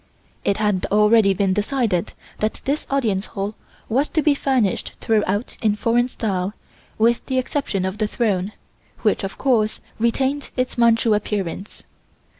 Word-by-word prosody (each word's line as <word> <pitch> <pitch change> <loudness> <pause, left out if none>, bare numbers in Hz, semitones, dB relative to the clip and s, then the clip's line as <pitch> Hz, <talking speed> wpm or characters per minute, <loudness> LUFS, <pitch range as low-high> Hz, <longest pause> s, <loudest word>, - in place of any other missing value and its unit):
It 200 - +1
had 210 -3 +1
already 210 0 +5
been 190 0 +2
decided 210 -3 0 0.3
that 215 0 -1
this 285 +3 -1
Audience 220 -8 0
Hall 200 +1 -4 0.3
was 270 +6 +1
to 315 - 0
be 300 - +5
furnished 260 -8 0
throughout 210 0 0
in 215 -2 +2
foreign 240 +2 +2
style, 200 -5 -2 0.4
with 230 +2 +3
the 260 - 0
exception 255 -7 -1
of 190 +3 -4
the 215 - +1
throne, 205 -4 0 0.5
which, 210 -2 +2
of 195 - -5
course, 225 -5 +1 0.2
retained 265 +5 0
its 255 0 0
Manchu 230 -1 +4
appearance. 205 -2 -3
215 Hz, 145 wpm, -22 LUFS, 200-250 Hz, 0.5 s, already